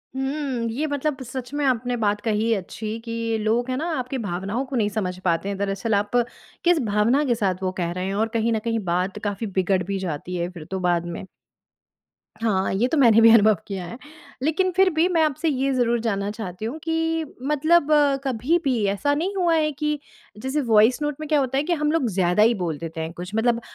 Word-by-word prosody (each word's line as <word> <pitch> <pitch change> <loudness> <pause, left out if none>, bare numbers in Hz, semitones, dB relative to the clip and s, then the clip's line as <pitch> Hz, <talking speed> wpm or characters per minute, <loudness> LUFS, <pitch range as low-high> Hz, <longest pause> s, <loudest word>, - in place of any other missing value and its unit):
हुँ। 265 -3 -2
ये 280 +7 -2
मतलब 285 -1 -2
सच 250 +1 -7
में 290 0 -1
आपने 245 -1 +1
बात 210 -2 0
कही 225 0 +1
अच्छी 215 +3 -5
कि 230 -1 -2
लोग 230 +4 0
है 255 - 0
ना 310 - -2
आपकी 255 +2 -3
भावनाओं 200 +3 -3
को 270 0 -6
नहीं 215 -4 +2
समझ 185 -4 -3
पाते 170 +2 +1
हैं 200 - -3
दरअसल 200 +3 -1
आप 205 +1 0 0.5
किस 350 -1 +4
भावना 215 +7 +2
के 245 -3 +2
साथ 190 -3 -1
वो 185 - 0
कह 170 - -1
रहे 180 +1 -3
हैं 195 - -2
और 220 +2 +1
कहीं 225 +1 +1
ना 220 - +1
कहीं 230 0 +1
बात 180 +4 -1
काफ़ी 205 +1 -2
बिगड़ 185 0 +2
भी 195 +2 -3
जाती 180 0 -4
है 175 0 -2
फिर 170 -4 -10
तो 190 - -2
बाद 175 -2 +1
में। 175 +2 -6 1.2
हाँ, 195 -5 +1
ये 215 +6 +2
तो 320 - +2
मैंने 230 -5 +6
भी 230 - +8
अनुभव 215 -1 +6
किया 190 -3 -4
है 230 - -8 0.5
लेकिन 330 +5 +1
फिर 380 0 +5
भी 320 +3 +3
मैं 335 -3 +2
आपसे 310 +2 0
ये 275 -1 0
ज़रूर 240 -2 +2
जानना 205 -3 -1
चाहती 210 -2 -6
हूँ 245 +7 -4
कि 325 0 0 0.3
मतलब 310 +1 +3 0.4
कभी 265 +5 +1
भी 255 -6 +1
ऐसा 285 +8 0
नहीं 365 +7 -2
हुआ 350 -3 +2
है 305 -1 +2
कि 300 +1 -2 0.4
जैसे 265 +7 -1
वॉइस 220 +6 +5
नोट 295 -1 -1
में 310 - -5
क्या 300 -2 +4
होता 265 -1 0
है 280 - +2
कि 345 +3 0
हम 300 -2 0
लोग 320 -6 +1
ज़्यादा 185 0 +2
ही 230 +2 +5
बोल 160 -3 -2
देते 165 +1 -6
हैं 160 +1 -5
कुछ 180 +3 -8
मतलब 230 +1 +2
230 Hz, 220 wpm, -23 LUFS, 195-285 Hz, 1.2 s, भी